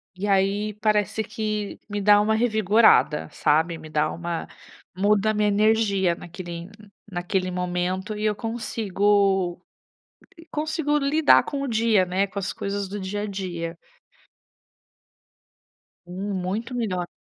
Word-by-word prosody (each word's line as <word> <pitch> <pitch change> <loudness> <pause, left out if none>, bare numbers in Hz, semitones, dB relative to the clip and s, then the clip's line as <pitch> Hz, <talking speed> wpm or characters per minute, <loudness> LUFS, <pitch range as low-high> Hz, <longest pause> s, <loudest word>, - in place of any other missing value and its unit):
e 200 +3 -3
aí 200 +2 +1
parece 210 0 +1
que 215 -2 -4
me 205 0 -3
dá 205 +1 +6
uma 215 +1 +2
revigorada, 220 -8 +3
sabe, 160 +3 +1
me 160 -1 -11
dá 150 0 0
uma 170 0 -4 0.5
muda 205 +2 +2
a - - -2
minha 210 0 +1
energia 205 -3 +2
naquele 175 0 -8 0.4
naquele 185 +1 -2
momento 180 +3 -2
e 210 - -2
eu 210 -1 +1
consigo 205 -4 0
co - - -46 0.9
consigo 300 -1 0
lidar 290 +2 +4
com 280 -1 -4
o - - -2
dia, 220 -4 +3
né, 185 +2 0
com 200 - -12
as 195 - -3
coisas 200 0 -3
do 205 +2 -6
dia 200 +2 -4
a - - -2
dia. 175 -4 -5 2.3
Hum, 190 +3 -5
muito 195 +7 -3
melhor. 185 -7 -2
200 Hz, 135 wpm, -24 LUFS, 180-215 Hz, 2.3 s, dá